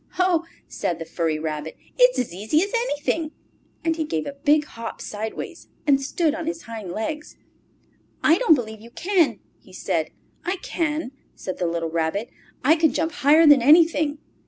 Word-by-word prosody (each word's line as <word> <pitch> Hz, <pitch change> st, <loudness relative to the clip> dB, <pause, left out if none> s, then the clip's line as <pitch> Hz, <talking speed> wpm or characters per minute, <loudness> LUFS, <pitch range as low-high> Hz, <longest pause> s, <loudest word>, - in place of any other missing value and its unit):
"Ho!" 365 Hz, -2 st, +2 dB, 0.2 s
said 170 Hz, -, -2 dB
the 165 Hz, -, -6 dB
furry 165 Hz, -1 st, -1 dB
rabbit. 155 Hz, 0 st, -4 dB, 0.2 s
"It's -, -, +5 dB
as 245 Hz, -8 st, -2 dB
easy 220 Hz, -, +1 dB
as 400 Hz, -, -5 dB
anything," 325 Hz, -8 st, -1 dB, 0.5 s
And 325 Hz, -1 st, 0 dB
he 320 Hz, -, 0 dB
gave 160 Hz, -, -2 dB
a 280 Hz, -, -5 dB
big 295 Hz, +2 st, +2 dB
hop 230 Hz, -5 st, -8 dB
sideways 215 Hz, +1 st, -6 dB, 0.2 s
and 280 Hz, -2 st, +4 dB
stood 300 Hz, +3 st, 0 dB
on 325 Hz, 0 st, -5 dB
his 330 Hz, 0 st, -3 dB
hind 220 Hz, -6 st, -7 dB
legs. 300 Hz, -, -5 dB, 0.9 s
"I 325 Hz, +4 st, +5 dB
don't 400 Hz, -11 st, +6 dB
believe 220 Hz, -4 st, -6 dB
you 230 Hz, -, -12 dB
can!" 345 Hz, +4 st, +1 dB, 0.2 s
he -, -, -19 dB
said. -, -, -1 dB, 0.3 s
"I 365 Hz, -, -1 dB
can!" 305 Hz, -5 st, -2 dB, 0.2 s
said 185 Hz, -, -6 dB
the 175 Hz, -, 0 dB
little 165 Hz, -1 st, -2 dB
Rabbit. 170 Hz, +7 st, -1 dB, 0.3 s
"I 300 Hz, +5 st, +5 dB
can 320 Hz, -2 st, +3 dB
jump 320 Hz, +5 st, -1 dB
higher 305 Hz, +3 st, +5 dB
than 290 Hz, -4 st, +7 dB
anything!" 305 Hz, +1 st, +5 dB
290 Hz, 175 wpm, -23 LUFS, 215-325 Hz, 0.9 s, than